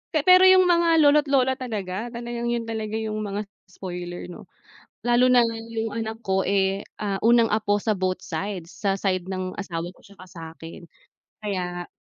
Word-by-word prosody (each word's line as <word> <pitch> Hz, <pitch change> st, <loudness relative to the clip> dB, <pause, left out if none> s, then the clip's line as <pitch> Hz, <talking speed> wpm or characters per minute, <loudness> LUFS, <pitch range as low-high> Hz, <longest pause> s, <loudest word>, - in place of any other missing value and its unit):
Pe 300 Hz, -, +2 dB
pero 370 Hz, +1 st, +7 dB
yung 375 Hz, 0 st, +7 dB
mga 340 Hz, -2 st, +3 dB
lolo't 295 Hz, 0 st, +5 dB
lola 265 Hz, -1 st, +2 dB
talaga, 215 Hz, -3 st, -4 dB
talagang 235 Hz, 0 st, -5 dB
yun 235 Hz, -1 st, -1 dB
talaga 220 Hz, -1 st, -4 dB
yung 220 Hz, -1 st, -3 dB
mga 210 Hz, 0 st, -3 dB, 0.2 s
spoiler 180 Hz, -1 st, -7 dB
no. -, -, -12 dB, 0.6 s
Lalo 250 Hz, +1 st, +4 dB
na 245 Hz, -2 st, +5 dB
yung 225 Hz, -1 st, -4 dB
anak 225 Hz, 0 st, -4 dB
ko, 190 Hz, 0 st, +2 dB
eh, 195 Hz, 0 st, +1 dB, 0.2 s
ah, 200 Hz, -2 st, -2 dB
unang 235 Hz, 0 st, +5 dB
apo 205 Hz, -1 st, +1 dB
sa 215 Hz, 0 st, 0 dB
both 185 Hz, 0 st, -1 dB
sides, 180 Hz, 0 st, -5 dB
sa 195 Hz, -2 st, -1 dB
side 185 Hz, -1 st, -1 dB
ng 185 Hz, 0 st, -4 dB
asawa 175 Hz, -4 st, -4 dB
ko -, -, -23 dB
'tsaka 195 Hz, -2 st, -15 dB
sa'kin, 165 Hz, -1 st, -10 dB, 0.6 s
kaya 180 Hz, -4 st, -4 dB
210 Hz, 170 wpm, -24 LUFS, 185-235 Hz, 0.6 s, pero